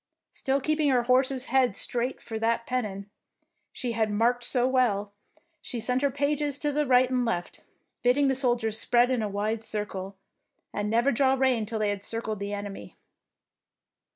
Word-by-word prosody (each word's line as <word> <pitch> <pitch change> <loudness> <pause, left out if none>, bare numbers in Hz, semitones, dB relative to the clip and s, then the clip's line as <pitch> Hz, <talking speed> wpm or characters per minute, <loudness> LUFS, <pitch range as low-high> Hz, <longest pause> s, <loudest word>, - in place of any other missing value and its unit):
Still 270 +1 0
keeping 305 +1 +1
her 250 -2 +3
horse's 260 +1 +2
head 255 -5 +2
straight 245 +5 -1
for 225 -1 -5
that 230 +1 0
pen 255 0 -1
non 200 0 -7 0.6
she 245 -2 -4
had 225 -1 0
marked 235 +4 +1
so 250 0 +1
well, 210 -6 +1 0.5
she 240 - -4
sent 250 +3 0
her 285 - +2
pages 285 +1 -1
to 295 0 -1
the 295 0 0
right 250 0 +5
and 250 -1 +1
left, 200 -7 -3 0.4
bidding 265 +3 +3
the 265 - +2
soldiers 240 -4 +1
spread 245 +2 +3
in 250 -3 +1
a 210 - -2
wide 215 +2 -2
circle, 200 -3 -5 0.6
and 205 0 -2
never 235 +5 +3
draw 265 +2 +3
rein 255 -5 +1
till 225 0 -3
they 215 -1 0
had 200 -1 -4
circled 220 -1 -3
the 200 0 -4
enemy. 205 -1 -7
240 Hz, 180 wpm, -27 LUFS, 215-260 Hz, 0.6 s, right